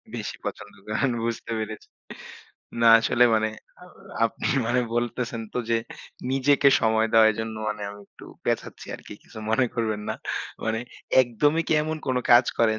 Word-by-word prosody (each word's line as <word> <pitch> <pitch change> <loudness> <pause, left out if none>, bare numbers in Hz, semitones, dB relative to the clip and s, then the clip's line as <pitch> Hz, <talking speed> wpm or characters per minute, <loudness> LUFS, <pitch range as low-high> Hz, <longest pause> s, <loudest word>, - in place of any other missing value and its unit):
বেশি - - -5
পছন্দ 100 0 -6
করেন 110 +4 0
বুঝতে 115 0 -4
পেরেছি 110 0 -6 0.9
না 115 - +6
আসলে 120 +2 +3
মানে 110 0 +2 0.3
আ - - -11 0.4
আপনি 115 - -2 0.2
মানে 125 +2 +2
বলতেছেন 120 -1 -2
তো - - 0
যে, 115 - +4 0.5
নিজেকে 140 +1 +4
সময় 110 0 +2
দেওয়া 110 -1 +7
এজন্য 110 +1 -5
মানে 105 -1 -4
আমি 100 0 -11
একটু - - -15 0.2
পেচাচ্ছি - - -3
আরকি। - - -11
কিছু 110 - -13
মনে 125 +3 +3
করবেন 110 -3 -1
না - - -1 0.5
মানে 110 0 0 0.4
একদমই 145 +7 +1
কি - - +2
এমন 155 0 -3
কোন 130 -1 0 0.2
কাজ 120 +1 +8
করেন 110 -1 +3
115 Hz, 160 wpm, -25 LUFS, 110-125 Hz, 0.9 s, কাজ